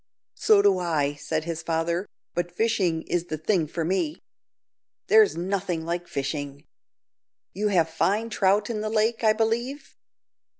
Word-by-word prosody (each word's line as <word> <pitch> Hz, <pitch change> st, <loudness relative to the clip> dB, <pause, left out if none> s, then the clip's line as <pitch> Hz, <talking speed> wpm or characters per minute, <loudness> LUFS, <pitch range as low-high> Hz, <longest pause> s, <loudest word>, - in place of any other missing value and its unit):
"So 205 Hz, -2 st, +4 dB
do 195 Hz, -2 st, +4 dB
I," 155 Hz, -5 st, 0 dB
said 155 Hz, +2 st, -3 dB
his 165 Hz, -1 st, -4 dB
father; 170 Hz, +3 st, -1 dB, 0.3 s
"but 175 Hz, 0 st, -2 dB
fishing 185 Hz, -5 st, 0 dB
is 175 Hz, -1 st, -1 dB
the 155 Hz, -3 st, -4 dB
thing 160 Hz, 0 st, +1 dB
for 165 Hz, +1 st, -3 dB
me. 195 Hz, -, -1 dB, 0.9 s
There's 435 Hz, -, +5 dB
nothing 180 Hz, -2 st, -2 dB
like 175 Hz, +1 st, -3 dB
fishing. 140 Hz, 0 st, -4 dB, 0.9 s
You 210 Hz, +3 st, -1 dB
have 175 Hz, -5 st, +3 dB
fine 205 Hz, +8 st, 0 dB
trout 205 Hz, +1 st, +2 dB
in 215 Hz, -2 st, -3 dB
the 215 Hz, -, -2 dB
lake, 225 Hz, +1 st, +1 dB
I 215 Hz, -1 st, +5 dB
believe?" 235 Hz, +6 st, -2 dB
180 Hz, 145 wpm, -25 LUFS, 165-215 Hz, 0.9 s, There's